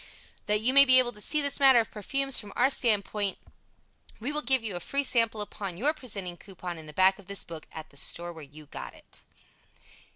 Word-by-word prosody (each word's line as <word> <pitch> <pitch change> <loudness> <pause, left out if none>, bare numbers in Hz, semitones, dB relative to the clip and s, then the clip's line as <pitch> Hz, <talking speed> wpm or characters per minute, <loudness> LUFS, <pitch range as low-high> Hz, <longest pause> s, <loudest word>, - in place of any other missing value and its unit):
That 210 0 +1
you 250 +4 +1
may 280 0 +8
be 260 -2 +5
able 250 -1 +3
to 210 -3 -12
see 300 +7 +1
this 280 0 0
matter 265 -3 +7
of 225 - -2
"perfumes" 275 +6 0
from 205 -2 -10
our 260 +3 +3
standpoint, 210 -4 0 0.8
we 245 +6 -2
will 300 0 -1
give 265 -4 +3
you 210 -5 -4
a - - -3
free 280 +10 +1
sample 230 -4 +1
upon 200 -3 -5
your 290 - +3
presenting 200 - -4
coupon 180 -3 -8
in 155 - -9
the - - -8
back 190 +4 +3
of 195 - -16
this 200 -1 -6
book, 165 -2 -10
at 160 -1 -10
the 140 - -16
store 175 +4 -1
where 160 - -11
you 150 +2 -14
got - - -9
it. - - -11
210 Hz, 225 wpm, -28 LUFS, 180-260 Hz, 0.8 s, may